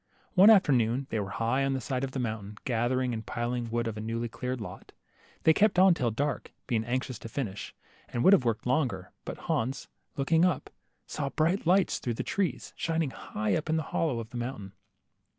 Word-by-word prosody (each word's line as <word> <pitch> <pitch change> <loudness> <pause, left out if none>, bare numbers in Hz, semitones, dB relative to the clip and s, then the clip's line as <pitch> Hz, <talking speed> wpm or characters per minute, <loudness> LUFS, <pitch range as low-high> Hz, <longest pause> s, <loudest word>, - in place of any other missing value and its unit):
One 195 +3 +8
afterno^ni 130 - +4
they 110 - -1
were 100 -1 -3
high 115 +6 0
on 135 0 +1
the 135 - -1
side 130 0 -2
of 135 - -1
the 130 - -6
mountain, 110 -4 -4
gathering 125 +1 +1
and 110 -1 -4
piling 120 +2 -2
the - - -7
wood 120 +1 -1
of 110 -1 -4
a - - -4
newly 115 +2 -2
cleared 125 +2 -4
lot. 105 - -9 0.5
They 160 - +6
kept 205 +1 +3
on 185 0 +7
till 125 -7 0
dark, 140 +6 -2
being 115 -4 0
anxious 125 0 -2
to 115 - -8
finish, 110 -7 -4 0.3
and 120 - -1
would 190 - +7
have 170 - +5
worked 115 -3 -1
longer, 125 - 0
but - - -5
Hans, 130 +4 -2 0.3
looking 160 +4 +3
up, 180 -6 +1 0.3
saw 140 -2 -3
bright 165 +5 +1
lights 185 +1 +3
through 120 -2 -2
the - - -3
trees, 185 -10 -2
shining 160 -4 -1
high 105 -4 -3
up, 155 0 -3
in 160 - +2
a 160 - 0
hollow 145 -5 -1
of 115 0 -7
the 120 - -5
mountain. 120 -5 -5
125 Hz, 210 wpm, -29 LUFS, 115-155 Hz, 0.5 s, One